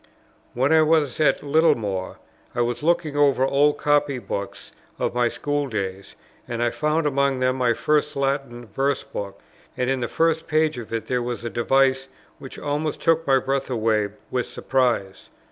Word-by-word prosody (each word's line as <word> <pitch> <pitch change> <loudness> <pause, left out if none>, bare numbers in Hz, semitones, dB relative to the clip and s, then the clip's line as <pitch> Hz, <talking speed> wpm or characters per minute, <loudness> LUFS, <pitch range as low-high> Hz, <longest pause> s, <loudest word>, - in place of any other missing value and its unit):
When 135 +6 +2
I 160 - +6
was 155 -4 +2
at 155 - +2
Littlemore, 140 - +1 0.4
I 120 - +1
was 120 +2 -1
looking 160 -2 +1
over 140 -2 +3
old 145 +2 +3
copy 145 -2 +1
books 100 -4 -6 0.3
of - - -1
my 120 0 +2
school 145 +5 -2
days, 100 -4 -5 0.3
and 120 -1 -2
I 120 - +1
found 155 +1 0
among 140 -2 +1
them 130 0 +1
my 120 -2 +2
first 150 +2 0
Latin 135 -3 -2
verse 135 +6 -1
book; 100 -1 -7 0.4
and 125 0 0
in 135 - 0
the 120 - -2
first 165 +2 0
page 155 -3 +1
of 115 - -9
it 115 -1 -3
there 125 -1 -1
was 120 -1 -4
a 115 - -3
device 135 +2 +2 0.3
which 135 - -9
almost 150 +1 -2
took 165 -1 +1
my 135 -1 +5
breath 135 +1 -1
away 110 -4 +1 0.2
with 125 -1 -1
surprise. 120 -7 -1
135 Hz, 175 wpm, -23 LUFS, 120-145 Hz, 0.4 s, I